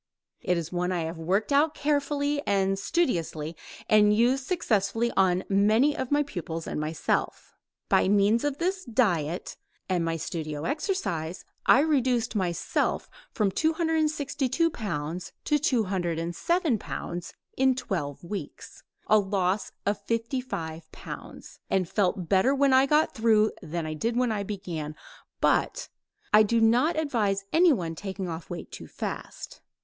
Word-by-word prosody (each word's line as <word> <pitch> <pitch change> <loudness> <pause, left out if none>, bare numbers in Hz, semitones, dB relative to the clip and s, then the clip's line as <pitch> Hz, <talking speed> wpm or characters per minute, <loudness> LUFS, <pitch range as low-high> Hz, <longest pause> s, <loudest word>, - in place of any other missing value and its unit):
It 180 - +1
is 170 -1 -4
one 180 0 -1
I 175 -2 0
have 165 +1 -5
worked 195 - 0
out 295 +2 +3
carefully 285 0 0
and 195 -1 +1
studiously 170 - -1 0.3
and 210 -1 +5
used 255 +4 +2
successfully 235 - +1
on 185 -1 +3
many 215 +9 +3
of 260 - -3
my 290 0 +3
pupils 165 - -5
and - - -3
myself. 155 +1 -2 0.3
By - - +3
means 205 +3 +3
of 290 -1 -1
this 370 +3 -1
diet 180 - 0 0.3
and 180 -3 0
my 165 0 -1
studio 155 -2 -4
exercise 230 - -2 0.2
I 270 - +7
reduced 255 -6 +1
myself 180 -4 -1 0.2
from 210 -3 +1
262 315 - +1
pounds 175 - -4
to 295 -1 +2
207 200 - 0
pounds 175 -2 -6 0.2
in 265 0 +3
twelve 170 - -4
weeks 195 +4 -7 0.2
a 215 - +5
loss 195 0 0
of 205 0 0
55 230 - -3
pounds, - - -10
and 185 -2 +1
felt 185 -2 0
better 200 +9 +3
when 275 -1 +3
I 260 +1 +5
got 300 +2 +3
through 220 -2 +3
than 165 +1 -4
I 155 - -3
did 230 +10 -1
when 250 -2 +2
I 210 -2 -1
began, 175 -7 -5 0.4
but, - - +1 0.4
I 210 - +8
do 230 +2 +2
not 245 +9 +3
advise 215 -10 0
anyone 280 - +3
taking 190 +1 -5
off 165 0 -6
weight 175 - -7
too - - -9
fast. - - -7
210 Hz, 140 wpm, -27 LUFS, 175-270 Hz, 0.4 s, I